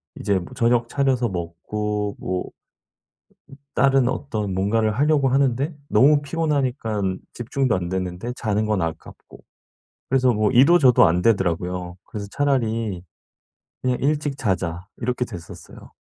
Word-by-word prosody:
이제 100 -1 0
뭐 90 +8 -10
저녁 120 -1 +2
차려서 130 -4 +1
먹고 105 +4 -3
뭐 90 0 -2
음 - - -11 1.3
다른 135 -1 +3
어떤 110 -8 -3
뭔가를 110 +3 +1
하려고 140 +2 +2
하는데 135 +3 +1
너무 145 +2 +5
피곤하니깐 130 - -1
집중도 125 0 -1
안 90 -2 -2
되는데 95 +5 -3
자는 110 -1 -1
건 105 -4 0
아깝고. 80 -1 -7 0.7
그래서 130 -1 +3
뭐 105 -1 +1
이도 145 +8 +6
저도 125 - +6
안 90 +2 +1
되더라고요. 90 -3 0
그래서 100 -2 -7
차라리 115 -9 0 0.8
"그냥 125 -1 +1
일찍 145 -1 0
자자." 90 - -2
이렇게 125 +1 -1
됐었어요. 90 -8 -11
115 Hz, 290 characters per minute, -22 LUFS, 95-135 Hz, 1.3 s, 이도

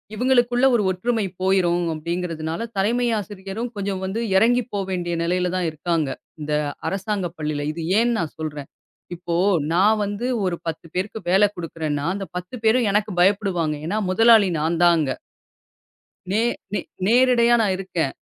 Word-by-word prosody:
இவங்களுக்குள்ள 245 +1 +2
ஒரு 220 - +2
ஒற்றுமை 220 +4 -1 0.2
போயிரும் 180 -2 +2
அப்படிங்கறதுனால, 165 0 -4 0.2
தலைமை 235 +5 +1
ஆசிரியரும் 205 +3 -6
கொஞ்சம் 200 -2 -3
வந்து 195 +5 -3
இறங்கி 245 +5 +4
போ 205 - -1
வேண்டிய 175 -2 -2
நிலையில 180 +1 0
தான் 180 -2 0
இருக்காங்க. 160 0 -1 0.3
இந்த 150 0 -3 0.4
அரசாங்க 195 -1 -2
பள்ளியில. 150 -2 -3
இது 165 +1 -5 0.2
ஏன் 240 +1 +2
நான் 165 -3 -3
சொல்றேன், 150 -3 -5 0.5
இப்போ, 170 0 -4 0.4
நான் 210 +5 +4
வந்து 205 +4 -3 0.2
ஒரு 180 -2 0
10 165 0 -4
பேருக்கு 195 +4 -2
வேல 195 +3 +5
குடுக்கறேன்னா, 155 -4 -3
அந்த 200 -1 -4
10 180 +6 -7
பேரும் 230 +1 +4
எனக்கு 210 +1 +1
பயப்படுவாங்க. 180 -5 +2
ஏன்னா, 205 +5 -1
முதலாளி 225 0 +6
நான் 160 +2 0
தான் 175 -1 +6
அங்க. 145 -5 0 1.2
நே 210 +3 +2 0.3
நே - - +1 0.3
நேரடையா 240 +1 +4
நான் 205 -4 +2
இருக்கன். 175 -7 -2
190 Hz, 150 wpm, -22 LUFS, 170-215 Hz, 1.2 s, முதலாளி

